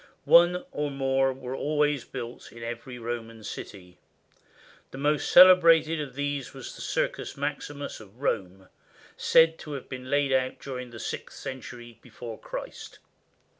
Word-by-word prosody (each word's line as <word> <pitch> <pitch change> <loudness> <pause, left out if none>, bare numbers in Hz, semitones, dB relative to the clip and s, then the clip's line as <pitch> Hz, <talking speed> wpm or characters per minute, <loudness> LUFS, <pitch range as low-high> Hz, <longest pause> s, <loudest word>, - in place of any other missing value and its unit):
One 175 +1 +6
or 150 0 -2
more 135 -1 +1
were 130 -1 -7
always 150 -1 0
built 120 -2 -8
in 115 0 -10
every 120 +2 -6
Roman 115 -1 -6
city. 90 -3 -9 0.9
The - - -10
most 145 +2 0
cele 185 0 +10
brated 165 -2 +4
of 135 -4 -7
these 145 -2 -3
was 135 - -8
the - - -10
Circus - - -2
Maximus 145 -1 -4
of 110 +2 -16
Rome, 95 -8 -2 0.5
said 165 0 +4
to 150 - -7
have 135 - -6
been 130 0 -7
laid 145 -1 +2
out 130 -1 +1
during 125 -2 -6
the 115 -1 -10
sixth - - -6
century 120 -2 -8
before 115 -2 -9
Christ. - - -8
135 Hz, 150 wpm, -27 LUFS, 120-150 Hz, 0.9 s, cele